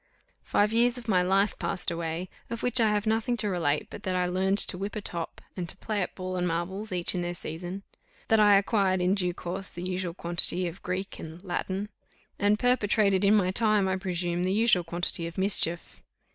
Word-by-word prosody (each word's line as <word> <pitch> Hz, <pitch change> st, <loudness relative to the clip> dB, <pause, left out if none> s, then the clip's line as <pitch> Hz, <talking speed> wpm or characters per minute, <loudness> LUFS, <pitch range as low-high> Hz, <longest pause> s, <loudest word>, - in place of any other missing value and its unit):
Five 210 Hz, +2 st, +1 dB
years 240 Hz, +2 st, +3 dB
of 240 Hz, -1 st, -10 dB
my 185 Hz, -4 st, +3 dB
life 195 Hz, +3 st, +1 dB
passed 180 Hz, -, -2 dB
away, 165 Hz, +1 st, -4 dB, 0.2 s
of 230 Hz, 0 st, -5 dB
which 245 Hz, 0 st, +4 dB
I 220 Hz, -, +4 dB
have 210 Hz, 0 st, 0 dB
nothing 225 Hz, +2 st, 0 dB
to 210 Hz, -2 st, -2 dB
relate 155 Hz, -6 st, 0 dB
but -, -, -8 dB
that 185 Hz, -1 st, -2 dB
I 180 Hz, 0 st, +1 dB
learned 190 Hz, +2 st, 0 dB
to 200 Hz, -, +9 dB
whip 200 Hz, +4 st, -5 dB
a -, -, -2 dB
top, 170 Hz, -4 st, -4 dB
and 175 Hz, -2 st, -5 dB
to 190 Hz, -, -6 dB
play 210 Hz, +1 st, -3 dB
at 180 Hz, -, -4 dB
ball 185 Hz, 0 st, -4 dB
and 180 Hz, 0 st, 0 dB
marbles, 190 Hz, +5 st, -3 dB
each 175 Hz, -2 st, +2 dB
in 180 Hz, -, -2 dB
their 175 Hz, 0 st, -3 dB
season; 175 Hz, +4 st, -6 dB, 0.4 s
that 225 Hz, -, +3 dB
I 205 Hz, -1 st, +6 dB
acquired 195 Hz, -2 st, +1 dB
in 180 Hz, +1 st, +2 dB
due 180 Hz, -3 st, -1 dB
course 185 Hz, +2 st, -4 dB
the 175 Hz, -, -8 dB
usual 180 Hz, -2 st, -3 dB
quantity 175 Hz, +1 st, 0 dB
of 170 Hz, +3 st, -8 dB
Greek 185 Hz, +2 st, -4 dB
and 160 Hz, +3 st, -9 dB
Latin; 190 Hz, +2 st, -3 dB, 0.5 s
and 205 Hz, +1 st, +3 dB
perpetrated 210 Hz, -5 st, +2 dB
in 200 Hz, +2 st, +5 dB
my 185 Hz, -3 st, +2 dB
time, 215 Hz, -1 st, +2 dB
I 190 Hz, -, 0 dB
presume, 175 Hz, -2 st, -2 dB
the 185 Hz, +1 st, 0 dB
usual 205 Hz, -3 st, +3 dB
quantity 170 Hz, 0 st, -1 dB
of 170 Hz, -, -10 dB
mischief. 190 Hz, -3 st, 0 dB
190 Hz, 215 wpm, -27 LUFS, 175-205 Hz, 0.5 s, to